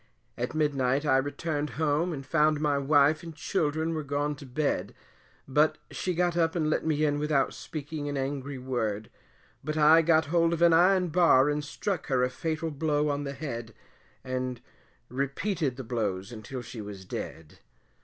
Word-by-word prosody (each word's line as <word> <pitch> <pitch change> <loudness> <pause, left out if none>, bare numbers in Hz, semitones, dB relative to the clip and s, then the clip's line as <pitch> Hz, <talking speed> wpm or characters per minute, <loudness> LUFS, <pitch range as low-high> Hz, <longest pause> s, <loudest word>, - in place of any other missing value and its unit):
At 125 +5 -3
midnight 140 -2 +1
I 135 -3 +4
returned 145 +2 -2
home 160 +3 +1
and 135 -4 -6
found 155 -1 +2
my 145 -2 +1
wife 145 +2 +4
and 165 -2 -9
children 160 -1 -1
were 155 - -2
gone 145 +1 -1
to 140 - -11
bed, 140 +3 -1 0.5
but 150 +3 +3
she 180 -2 -2
got 175 0 +1
up 165 -1 +1
and 155 -3 +1
let - - 0
me 155 -1 +1
in 145 -1 +1
without 150 -2 +1
speaking 150 -1 -6
an 145 - -3
angry 135 0 -3
word; 110 -5 -3 0.5
but 155 +2 -3
I 155 +2 +7
got 160 -1 +3
hold 170 -1 +3
of 170 0 +1
an 170 -1 +6
iron 180 +2 +4
bar 155 -5 +5
and 150 0 -2
struck 170 +4 -3
her 130 -2 +2
a 125 - +1
fatal 160 +2 -3
blow 150 0 0
on 145 0 -2
the 140 - -4
head, 120 -6 -6 0.5
and 130 -1 -3 0.5
repeated 140 - -2
the 130 - -6
blows 105 -4 -2
until 120 +3 -7
she 115 -1 -8
was 100 -2 -8
dead. 80 -3 -7
145 Hz, 175 wpm, -28 LUFS, 130-160 Hz, 0.5 s, I